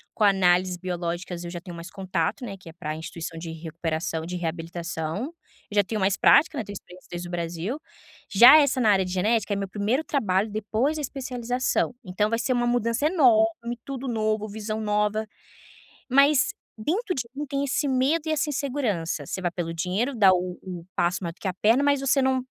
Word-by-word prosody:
com 215 - 0
análises 185 -2 +3
biológicas 175 0 -4
eu 170 - -6
já 175 - -5
tenho 175 -1 -9
mais 170 +2 -9
contato, 190 +4 -2
né, 195 -3 -6
que 175 -3 -13
é - - -12
pra 155 -3 -5
instituição 165 0 -6
de 165 0 -6
recuperação 160 0 -3
de 180 +1 -4
reabilitação. 170 +3 -4 0.4
Eu 210 - -8
já 205 - +5
tenho 215 +2 -3
mais 195 +1 +2
prática, 310 -1 +5
né, 225 - -1
tenho 205 - -8
experiência 180 -1 -12
desde 175 0 -5
o - - -9
Brasil. 175 - -3 0.5
Já 245 +9 +9
essa 280 -3 +3
na 220 -4 +4
área 190 -1 +3
de 180 - -5
genética 210 +3 +1
é - - -1
meu 195 -1 -3
primeiro 215 +10 0
trabalho 210 -6 +1
depois 220 +8 -1
da 305 - -3
especialização, 250 -2 -1
então 205 +3 0
vai 230 0 0
ser 255 - 0
uma 240 0 +1
mudança 240 +3 +1
enorme, 235 -6 +3
tudo 270 -1 -5
novo, 215 -2 0
visão 215 +1 -4
nova. 210 0 0 0.8
Mas 275 +5 +5 0.3
dentro 365 - -1
de 255 - -1
mim 295 +2 -4
tem 280 0 -2
esse 280 +1 0
medo 270 +5 +2
e - - 0
essa 305 0 0
insegurança. 235 - -2
Você 190 - -4
vai 175 -1 -1
pelo 170 -2 -4
dinheiro, 190 +11 -1
dá 200 -5 +6
o 180 0 -2
o 180 -3 -7
passo 175 +1 +1
maior 170 -1 -3
que 195 - -4
a 185 - -1
perna, 225 +8 +3
mas 285 -1 +3
você 275 0 +3
não 260 -1 +1
210 Hz, 200 wpm, -25 LUFS, 175-255 Hz, 0.8 s, Já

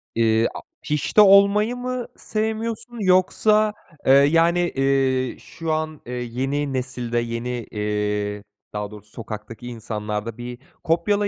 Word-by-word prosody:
İii, 115 0 +3
a - - -6 0.2
pişti 150 +8 +2
olmayı 200 +3 +6
mı 250 0 -3
sevmiyorsun 220 +2 -3
yoksa, 210 +3 +3 0.3
eee, - - +5
yani, 165 +5 +5
eee, 135 -5 +1
şu 165 -1 -5
an, 155 -1 -3
eee, 125 - -6
yeni 135 +4 -2
nesilde 125 -2 -2
yeni, 115 +1 -3 0.2
eee, 105 -1 -2 0.3
daha 105 0 -4
doğrusu 105 0 -12
sokaktaki 115 +1 -8
insanlarda 110 -1 -4
bir 120 0 -6 0.3
kopyala 200 +5 +1
135 Hz, 120 wpm, -23 LUFS, 115-190 Hz, 0.3 s, olmayı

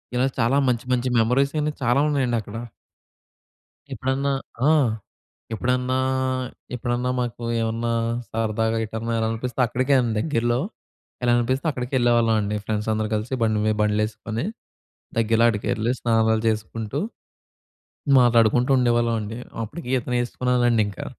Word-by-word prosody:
ఇలా 125 +2 +2
చాలా 120 +5 +3
మంచి, 120 0 -1
మంచి 125 0 0
మెమోరీస్ 125 +5 +2
అన్ని 150 0 -1
చాలా 125 +3 +3
ఉన్నాయండక్కడ. 120 -6 -1 1.4
ఎప్పుడన్నా 135 +2 -1 0.4
ఆ! - - +6 0.8
ఎప్పుడన్నా 125 +2 0 0.8
ఎప్పుడన్నా 120 +1 -1
మాకు 120 -1 -3 0.2
ఏమన్నా 115 +1 -1 0.4
సరదాగా 115 0 0
ఎటన్నా 110 +2 -4
ఎల్లాలనిపిస్తే 115 +3 -2
అక్కడికే 130 +4 0
అండి 120 -2 0
దగ్గరలో. 120 -3 0 0.7
ఎల్లాలనిపిస్తే 120 +4 +1
అక్కడికే 125 -1 -5
ఎళ్ళేవాళ్ళమండి 115 -3 +2
ఫ్రెండ్స్ 105 0 -2
అందరూ 110 0 -1
కలిసి 110 +4 -2
బండి 110 -2 +2
మీద 110 0 +2
బండ్లు 105 0 +2
ఏసుకొని, 110 +4 -5 0.7
దగ్గరలో 115 0 +3
ఆడికెళ్లి 110 +1 -1
స్నానాలు 110 -1 +2
చేసుకుంటూ, 110 0 -2 1.2
మాట్లాడుకుంటూ 120 +1 +4
ఉండేవాళ్ళమండి. 115 -3 +1 0.3
అప్పటికి 120 +8 -8
ఈత 120 - -6
నేర్చుకున్నానండింకా. 120 -4 +1
115 Hz, 110 wpm, -23 LUFS, 110-125 Hz, 1.4 s, ఆ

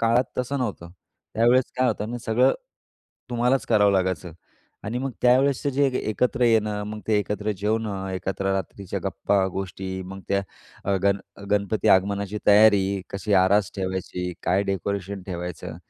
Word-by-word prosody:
काळात 115 +2 +3
तसं 125 +3 -1
नव्हतं. 100 -9 -4 0.4
त्यावेळेस 120 +3 +4
काय 130 0 +3
होतं 105 -1 -2
ना 120 - -4
सगळं 120 +3 +4 0.8
तुम्हालाच 125 +2 +1
करावं 105 -3 +4
लागायचं 95 -3 -1 0.5
आणि 110 +4 -2
मग 135 +1 -2
त्यावेळेसचं 135 +3 +3
जे 140 +1 +2
एकत्र 120 +4 0
येणं, 110 -3 +2
मग 105 0 -6
ते 105 -2 +4
एकत्र 105 +1 -2
जेवणं, 105 -2 -1
एकत्र 95 +1 -2
रात्रीच्या 95 0 -4
गप्पा, 100 -1 +1
गोष्टी 95 0 -5
मग 95 +1 -8
त्या 100 0 +1 0.4
अ, 100 0 +1
गण 100 0 +3 0.3
गणपती 105 +2 +1
आगमनाची 100 +1 +2
तयारी. 100 -2 +5
कशी 100 +1 -3
आरास 100 +1 +3
ठेवायची? 95 -1 -3
काय 95 +3 +2
डेकोरेशन 100 0 -3
ठेवायचं? 90 -2 -6
100 Hz, 145 wpm, -24 LUFS, 95-115 Hz, 0.8 s, तयारी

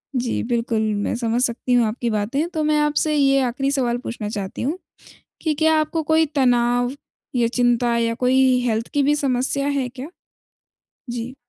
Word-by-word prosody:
जी 245 -2 -1
बिल्कुल, 230 -1 -1
मैं 205 +3 -1
समझ 235 0 -1
सकती 250 +1 -1
हूँ 240 -1 +4
आपकी 235 +2 -2
बातें। 230 +9 -1
तो 315 -3 -2
मैं 305 0 +2
आपसे 300 +1 +1
ये 275 -1 +3
आखिरी 260 +3 -1
सवाल 250 -4 0
पूछना 220 -3 -4
चाहती 200 -3 -5
हूँ 295 +8 -1 0.6
कि 315 - 0
क्या 315 +1 +3
आपको 310 +1 -1
कोई 315 +1 +3
तनाव 245 -2 +2 0.4
या 240 -1 +3
चिंता 240 0 +1
या 230 0 +1
कोई 255 +1 +3
हेल्थ 225 0 -1
की 290 - +2
भी 295 +2 +3
समस्या 275 0 0
है 280 -3 0
क्या? 260 +3 -8 1.0
जी। 240 +2 -5
250 Hz, 170 wpm, -21 LUFS, 235-280 Hz, 1.0 s, हूँ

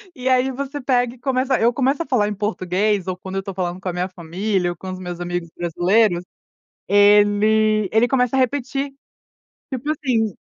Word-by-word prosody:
E 255 -2 -2
aí, 255 0 +3
você 280 +2 -5
pega 245 -2 +1
e - - -18
começa. 260 0 0
Eu 235 +2 +4
começo 270 +4 +1
a - - -9
falar 240 -6 +1
em 210 - -3
português, 200 -1 -1
ou 185 -1 -3
quando 190 +1 -7
eu 195 - -1
tô 195 0 -7
falando 180 -1 -3
com 190 - -5
a - - -1
minha 180 +1 -2
família 180 +2 -2
ou 175 - -6
com 185 +3 -8
os 185 - -6
meus 175 -1 -6
amigos 175 -1 -4
brasileiros, 175 +2 +2 0.6
ele 205 +1 +4
ele 225 +2 +4
começa 250 0 +1
a - - +2
repetir. 275 +2 -1 0.8
Tipo 265 +3 -3
assim, 245 -8 0
215 Hz, 195 wpm, -21 LUFS, 185-255 Hz, 0.8 s, Eu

